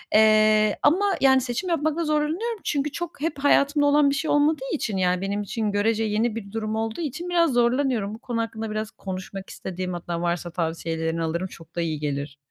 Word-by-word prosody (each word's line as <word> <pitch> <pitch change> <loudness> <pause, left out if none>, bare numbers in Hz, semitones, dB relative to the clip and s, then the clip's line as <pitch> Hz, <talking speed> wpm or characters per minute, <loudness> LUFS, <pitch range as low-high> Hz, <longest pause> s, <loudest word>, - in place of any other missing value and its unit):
Eee, 215 -1 +5
ama, 370 +7 +4 0.2
yani, 265 -1 +5
seçim 260 +9 -3
yapmakta 320 0 0
zorlanıyorum 320 +10 -1
çünkü 285 0 -1
çok, 335 -2 -6
hep 305 -3 -2
hayatımda 285 +1 +3
olan 290 0 +5
bir 280 - 0
şey 315 +3 -1
olmadığı 290 -2 +2
için 220 -10 -2
yani, 180 0 +1
benim 200 +1 -1
için 210 +1 -2
görece 220 +2 +1
yeni 220 +1 0
bir 200 -3 -7
durum 220 -1 -3
olduğu 225 +7 -2
için 325 +4 -4
biraz 335 -5 +3
zorlanıyorum. 240 -3 +1
Bu 220 - -9
konu 240 -3 -2
hakkında 225 -1 -4
biraz 215 0 -3
konuşmak 190 0 -7
istedim, 185 -1 -5
hatta 170 0 -4
varsa 175 0 -2
tavsiyelerini 165 -1 -2
alırım, 170 +3 -2
çok 165 -1 -15
da 170 - -1
iyi 155 -3 -2
gelir. 145 -1 -3
220 Hz, 190 wpm, -24 LUFS, 185-290 Hz, 0.2 s, Eee